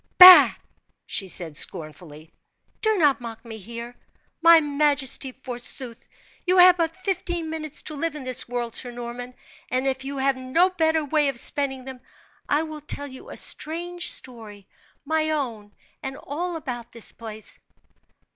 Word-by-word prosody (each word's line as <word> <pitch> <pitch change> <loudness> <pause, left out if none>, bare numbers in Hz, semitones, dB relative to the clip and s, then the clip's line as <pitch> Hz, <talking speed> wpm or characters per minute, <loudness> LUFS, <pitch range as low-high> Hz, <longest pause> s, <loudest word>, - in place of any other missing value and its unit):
"Bah!" 365 0 +11 0.5
she 195 - 0
said, 170 -4 -2
scornfully. 155 +1 -1 0.5
"Do 435 -1 +2
not 290 -7 +2
mock 230 -1 -9
me 225 -1 -8
here. 235 +4 -9 0.5
My 335 0 +8
majesty, 285 -3 +1
forsooth! 245 -1 -6 0.4
you 365 0 +1
have 360 0 +8
but 330 0 -2
fifteen 350 -4 -3
minutes 310 -2 -6
to 310 - -5
live 325 +1 -3
in 295 - -7
this 255 -2 0
world, 240 -2 -4
Sir 250 - +1
Norman; 245 +1 -8 0.3
and 255 +1 -1
if 265 -1 -2
you 275 +1 -6
have 270 0 +1
no 260 +9 +1
better 320 -3 +1
way 295 0 +1
of 270 -3 -2
spending 265 -1 0
them, 260 -1 -9 0.5
I 295 +2 +2
will 310 -1 -8
tell 285 -1 -4
you 260 -2 -11
a - - -8
strange 345 +2 -1
story 215 -6 0 0.4
my 315 +1 0
own, 235 -9 -4 0.3
and 270 0 -6
all 345 +6 -5
about 245 -7 -7
this 230 - -5
place." 220 -2 -8
270 Hz, 155 wpm, -23 LUFS, 240-320 Hz, 0.5 s, Bah